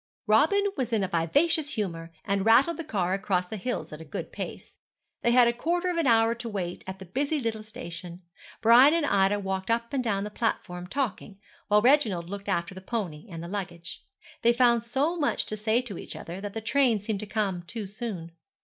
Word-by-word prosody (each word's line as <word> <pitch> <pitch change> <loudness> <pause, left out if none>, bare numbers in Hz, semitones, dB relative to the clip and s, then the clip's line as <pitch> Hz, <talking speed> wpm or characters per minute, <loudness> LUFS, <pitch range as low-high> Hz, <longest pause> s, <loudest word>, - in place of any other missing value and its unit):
Robin 310 - +4
was 255 -4 -2
in 220 -3 +2
a - - 0
vivacious 290 - +1
humour, 165 -6 -3
and 195 -1 0
rattled 255 +10 +5
the 330 - -4
car 190 - -1
across 195 -2 0
the 200 - -6
hills 230 -4 -4
at 155 - -8
a - - -7
good 150 - -6
pace. - - -7 0.4
They 235 - +2
had 240 0 +6
a 235 - +2
quarter 345 +8 0
of 350 - -1
an 330 -4 +2
hour 225 -1 +4
to 235 0 -6
wait 180 -4 -4
at 190 0 -5
the 190 - -10
busy 280 - -1
little 225 -4 -2
station. 180 -6 -7 0.4
Brian 245 +7 +7
and 335 -3 +1
Ida 200 -4 +3
walked 190 0 -3
up 235 +3 0
and 265 -2 0
down 200 -4 0
the 210 - -5
platform 180 -6 -2
talking, 235 -4 -3 0.3
while 210 0 +4
Reginald 220 - +3
looked 200 0 -6
after 170 +1 -1
the 190 - -9
pony 190 -5 -4
and 165 -2 -7
the - - -6
luggage. 175 -3 -6 0.4
They 235 0 +5
found 240 -1 +4
so 275 +8 0
much 295 -3 0
to 215 - -3
say 220 +3 +1
to 205 -8 -7
each - - -8
other, 175 +3 -7
that 205 0 -6
the 225 - -3
train 240 +1 +3
seemed 205 0 -3
to 215 - -6
come 200 -4 -1
too 210 +5 -6
soon. 195 -5 -6
215 Hz, 215 wpm, -27 LUFS, 190-245 Hz, 0.4 s, Brian